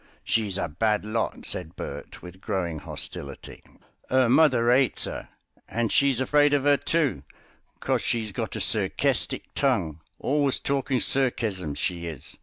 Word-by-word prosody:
"She's 105 -4 0
a 90 - -1
bad 105 +6 0
lot," 110 +1 -2
said 80 - -3
Bert - - -7
with 90 +1 -11
growing 90 -7 -2
hostility. 70 -1 -7 0.5
"'Er 130 -2 +4
mother 125 -4 +5
'ates 130 0 +3
her, - - -6 0.4
and 115 -2 -1
she's 140 -3 +3
afraid 145 +2 +4
of 140 -1 0
'er, 145 0 +6
too, 160 -3 +1 0.6
cos - - +1
she's 110 -3 -1
got - - -4
a - - -3
serkestic - - 0
tongue; 80 -1 0 0.2
always 140 -1 +1
talking 135 -2 0
serkesms, 110 - 0
she 85 -2 -2
is. 80 -6 -7
115 Hz, 145 wpm, -26 LUFS, 90-135 Hz, 0.6 s, er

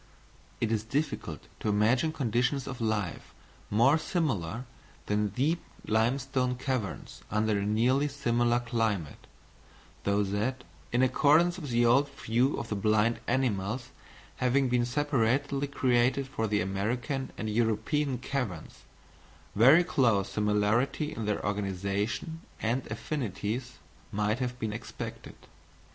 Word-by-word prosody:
It 115 - 0
is 110 -2 0
difficult 130 - -3
to - - -1
imagine 115 +9 +3
conditions 125 -1 0
of 130 -3 -6
life 105 -6 -2 0.3
more 125 +9 +4
similar 125 - -1 0.4
than 105 0 +1
deep 140 - 0 0.2
limestone 125 +3 +1
caverns 125 -5 -4
under 105 0 +1
a 100 - -1
nearly 125 +7 +2
similar 120 -4 +1
climate; 110 - -2 0.8
so 100 +1 +2
that, 105 +6 -2 0.3
in 125 +2 +3
accordance 155 +7 +4
with 150 -5 -6
the 120 0 +3
old 135 +5 +4
view 130 0 0
of 115 - -5
the 105 - -1
blind 110 +3 +2
animals 120 -2 0 0.5
having 130 +1 +2
been 120 -1 +2
separately 140 +1 +1
created 130 0 +2
for 110 -4 -2
the 105 0 +1
American 120 +9 -2
and 110 - -3
European 120 +5 +1
caverns, 120 -9 -4 0.7
very 135 - +7
close 115 - +2
similarity 105 +8 +1
in 115 -8 -4
their 105 0 -1
organisation 100 - -2 0.2
and 120 +4 -1
affinities 115 -1 -4 0.3
might 105 +3 0
have 125 -1 -2
been 110 -3 -3
expected. 115 - -7
120 Hz, 125 wpm, -29 LUFS, 105-135 Hz, 0.8 s, very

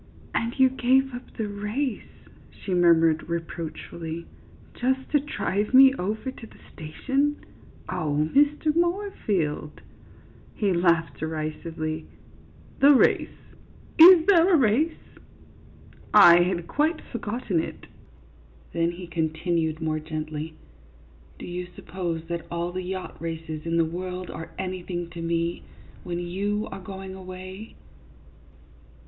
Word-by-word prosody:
" - - -24
And 230 +3 -1
you 265 - +7
gave 265 +1 +2
up 245 +1 -9
the 220 -3 -2
race," 210 +5 -4 0.2
she 190 - -6
murmured, 165 -2 +4
re 170 - +1
proachfully, 165 0 -7 0.3
" - - -24
just 260 +1 0
to 295 - +4
drive 235 -6 -1
me 265 0 +9
over 220 +3 -3
to 235 -3 -12
the - - -18 0.2
station? 270 - -1 0.5
Oh, 155 -4 0
Mr. 295 +2 +3
Moorfield! 330 - -1 0.4
" - - -25
He 200 -3 +1
laughed 170 -1 +1
derisively. 155 0 -4 0.7
"The 285 +1 +7
race! - - +3 0.7
Is 335 0 +10
there 370 -2 +5
a 340 - +6
race? 270 +6 +2 1.2
I 175 -5 +9
had 175 -1 0
quite 310 - 0
for 235 - -4
gotten 210 -5 -2
it." - - -8 0.9
Then 170 0 0
he 180 +1 -8
continued 160 -1 -1
more 155 -1 -1
gently, 155 0 -5 0.4
" 70 +2 -27
Do - - -8
you 180 0 -5
suppose 170 -4 -4
that 170 0 -5
all 170 +1 -3
the 185 +1 -4
yacht 185 -1 -6
races 160 -1 -5
in 165 0 0
the 165 - +4
world 180 +2 -5
are 160 +1 -7
anything 180 -2 -4
to 170 - -7
me, 170 0 -1 0.4
when 175 -1 -4
you 200 +4 -2
are 195 - -7
going 190 0 -8
away 185 +2 -9
180 Hz, 135 wpm, -25 LUFS, 165-240 Hz, 1.2 s, Is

